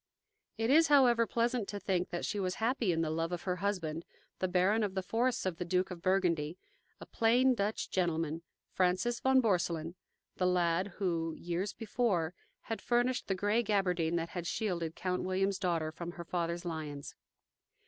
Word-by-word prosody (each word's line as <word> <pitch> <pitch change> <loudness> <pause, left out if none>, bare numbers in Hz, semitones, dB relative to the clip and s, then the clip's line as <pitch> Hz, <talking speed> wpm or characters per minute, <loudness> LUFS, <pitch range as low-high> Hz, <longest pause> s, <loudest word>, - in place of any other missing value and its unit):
It 225 +3 +1
is, 325 +3 +6
however, 245 -5 +5
pleasant 235 -2 0
to 205 - -4
think 185 -2 -1
that 175 - -3
she 205 - -2
was 185 -1 -1
happy 230 -3 +1
in 165 -1 0
the 155 -1 0
love 165 +2 -1
of 175 - -4
her 180 -1 -1
husband, 170 -6 -2 0.4
the 185 - +1
baron 185 +5 +2
of 200 -3 -1
the 190 - -1
forests 240 +5 0
of 185 -3 -1
the 180 - -2
Duke 180 +2 0
of 175 -2 -7
Burgundy, 175 -4 +1 0.4
a - - -9
plain 245 +3 +3
Dutch 210 -1 -1
gentleman, 165 -3 0 0.3
Francis 185 +6 +1
von 265 0 +4
Borselen, 170 -5 0 0.4
the 180 - +2
lad 180 +1 +2
who, 165 -4 -1
years 175 +4 -3
before, 200 -7 0 0.3
had 225 - -5
furnished 245 +1 +1
the 195 - 0
gray 205 +5 +2
gabardine 180 -6 +1
that 170 0 -1
had 175 -2 -5
shielded 170 -7 -2
Count 180 -1 -2
William's 190 +1 0
daughter 165 -4 0
from 170 +1 -6
her 170 - -8
father's 170 0 -2
lions. 150 -4 -5
185 Hz, 180 wpm, -32 LUFS, 170-215 Hz, 0.4 s, is